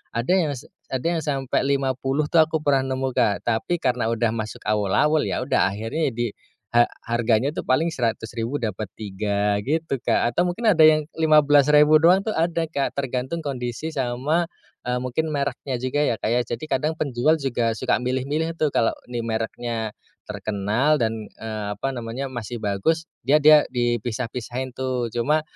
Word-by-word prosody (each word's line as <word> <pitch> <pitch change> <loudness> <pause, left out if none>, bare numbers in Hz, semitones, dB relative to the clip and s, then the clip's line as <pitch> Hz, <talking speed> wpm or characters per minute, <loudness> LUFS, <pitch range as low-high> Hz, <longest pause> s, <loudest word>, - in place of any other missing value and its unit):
Ada 120 +7 0
yang 160 -6 +1
se 125 - -11 0.2
ada 130 +2 -3
yang 170 -1 0
sampe 135 -3 -1
50 135 +1 0
tuh 165 - +6
aku 160 0 -2
pernah 140 -2 +3
nemu 130 0 -1
Kak, 100 -4 +2
tapi 120 +10 0
karena 125 -3 0
udah 115 0 +1
masuk 110 -1 -5
awul-awul 105 +9 +2
ya - - -1
udah 130 -6 +2
akhirnya 115 +9 -2
di 120 0 -1 0.5
eee, 120 0 +5 0.2
harganya 115 +2 +2
tuh - - -3
paling 155 +6 +2
Rp100.000 115 +2 -2
dapet 110 -2 -3
tiga 100 0 -1
gitu, 155 0 -1
Kak. 120 - +1
Atau 175 - +3
mungkin 220 +6 0
ada 160 -4 +5
yang 155 -1 +3
Rp15.000 150 -1 +5
doang 180 +3 +6
tuh 220 - -2
ada 165 0 0
Kak, 140 -3 -1
tergantung 130 +4 -2
kondisi 125 +1 -4
sama 135 +6 0 0.4
eee, 125 0 0
mungkin 155 +5 -2
mereknya 140 -1 -2
juga 130 +3 0
ya, 120 - +1
Kak - - -1
ya. 125 - +3
Jadi 120 +6 -5
kadang 155 +3 0
penjual 140 +2 +2
juga 120 -4 0
suka - - +2
milih-milih 140 +6 -1
tuh 155 - +2
kalau 115 - +3 0.2
nih 120 -1 -3
mereknya 115 0 -3 0.3
terkenal 110 +9 0
dan 110 -1 -1 0.2
eee, 110 -2 -4
apa 135 - -2
namanya 120 +2 -4
masih 120 -1 -5
bagus, 110 +12 0 0.2
ya 140 +4 +5
dia 150 0 +7
dipisah-pisahin 120 +1 -2
tuh. 130 -2 -2
Cuma 145 +7 +1
130 Hz, 165 wpm, -23 LUFS, 115-150 Hz, 0.5 s, dia